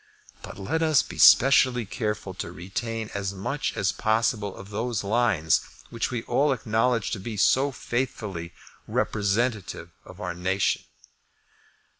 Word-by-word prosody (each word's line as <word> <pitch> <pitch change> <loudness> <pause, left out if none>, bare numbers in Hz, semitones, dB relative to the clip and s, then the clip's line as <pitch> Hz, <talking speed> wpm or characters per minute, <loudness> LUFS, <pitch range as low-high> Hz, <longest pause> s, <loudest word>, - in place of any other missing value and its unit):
But - - -9
let 150 +12 -2
us 155 -4 +4
be 85 - -10
specially 125 - +6
careful 105 -2 -3
to 85 - -6
retain 110 +5 -5
as 100 -1 -3
much 140 +10 -3
as 95 -2 +1
possible 110 -2 0
of 95 +2 -11
those 115 +1 -2
lines 100 -7 +2 0.3
which 115 -1 -2
we 120 -3 -3
all 140 +4 +2
acknowledge 115 -1 0
to 105 - -2
be 105 +2 -6
so 135 +7 +3
faithfully 105 -10 -4 0.4
representative 105 -4 -1
of 90 +1 -13
our 90 -4 -3
nation. 95 +3 0
110 Hz, 135 wpm, -26 LUFS, 95-120 Hz, 0.4 s, specially